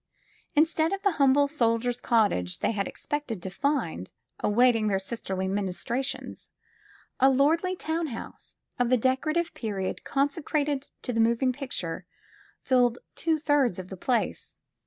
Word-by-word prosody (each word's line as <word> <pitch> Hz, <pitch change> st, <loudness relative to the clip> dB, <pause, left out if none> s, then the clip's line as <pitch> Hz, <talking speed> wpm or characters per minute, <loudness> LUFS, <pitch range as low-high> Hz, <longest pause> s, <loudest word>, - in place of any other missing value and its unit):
Instead 320 Hz, +1 st, +3 dB
of 395 Hz, -, -4 dB
the 400 Hz, -, +4 dB
humble 275 Hz, +1 st, +5 dB
jsoldier 245 Hz, -4 st, +1 dB
's 240 Hz, -, -8 dB
cottage 200 Hz, -, +2 dB
they -, -, +2 dB
had 200 Hz, -3 st, -1 dB
expected 295 Hz, -8 st, -4 dB
to 190 Hz, -, -5 dB
find 225 Hz, -, -1 dB, 0.3 s
awaiting 225 Hz, 0 st, +3 dB
their 200 Hz, -2 st, +2 dB
sisterly 190 Hz, -2 st, -3 dB
ministrations, 205 Hz, +7 st, -3 dB, 0.7 s
a 265 Hz, -, +6 dB
lordly 320 Hz, +7 st, +2 dB
town 325 Hz, -1 st, -2 dB
house, 240 Hz, -, -9 dB, 0.2 s
of 245 Hz, -1 st, +2 dB
the 255 Hz, -, +5 dB
decorative 310 Hz, +8 st, 0 dB
period 200 Hz, -5 st, -3 dB
consecrated 285 Hz, 0 st, -1 dB
to 250 Hz, -, -3 dB
the 230 Hz, -, 0 dB
moving 235 Hz, +3 st, +3 dB
picture, 190 Hz, -, -5 dB, 0.6 s
filled 245 Hz, -2 st, +3 dB, 0.2 s
two 325 Hz, -1 st, 0 dB
thirds 290 Hz, -, +2 dB
of 185 Hz, 0 st, -7 dB
the 190 Hz, -, -6 dB
place. 240 Hz, +6 st, -2 dB
250 Hz, 140 wpm, -27 LUFS, 215-290 Hz, 0.7 s, a